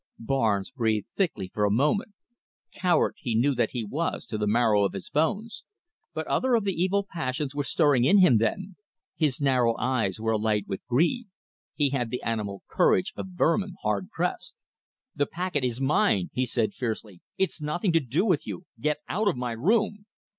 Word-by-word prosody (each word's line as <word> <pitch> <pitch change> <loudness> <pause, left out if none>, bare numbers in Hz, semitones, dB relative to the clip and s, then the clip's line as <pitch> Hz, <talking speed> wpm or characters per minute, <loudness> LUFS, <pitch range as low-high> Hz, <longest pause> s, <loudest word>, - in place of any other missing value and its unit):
Barnes 110 -5 0
breathed 110 -5 -1
thickly 155 - -2
for 105 - 0
a 105 - +3
moment. 150 - +1 0.6
Coward 180 -2 +2
he 120 -6 -2
knew 135 +6 +3
that 125 - +1
he 120 -3 -3
was 150 +11 -3
to 110 - -4
the 105 - 0
marrow 110 -2 +3
of 100 - 0
his 95 -2 -7
bones, 205 +9 -1 0.5
but - - -4
other 255 -1 +2
of 225 - +1
the 195 -1 0
evil 190 +4 +1
passions 140 -5 -3
were 145 0 -1
stirring 145 -5 +3
in 170 +11 +5
him 160 - +6
then. 190 - -2 0.4
His 150 -3 +1
narrow 125 -5 +2
eyes 115 -7 0
were 110 0 0
alight 105 -2 +1
with 95 - -5
greed. 175 - +1 0.5
He 145 -3 +2
had 125 -4 -1
the 125 - -4
animal 105 -4 -3
courage 90 - +2
of - - -5
vermin 190 +3 +1
hard 100 -4 -1
pressed. - - -4 0.5
"The 145 - +1
packet 175 -5 -2
is 125 -1 -1
mine," 135 - +2
he 130 0 0
said 110 -3 0
fiercely. 110 -6 -5 0.2
"It's 190 -4 -1
nothing 175 +5 0
to 165 - +5
do 140 - 0
with 175 -8 +1
you. 175 - -6
Get 150 0 -1
out 210 +3 0
of 190 - +1
my 125 -1 -2
room." 205 - 0
135 Hz, 185 wpm, -27 LUFS, 110-175 Hz, 0.6 s, him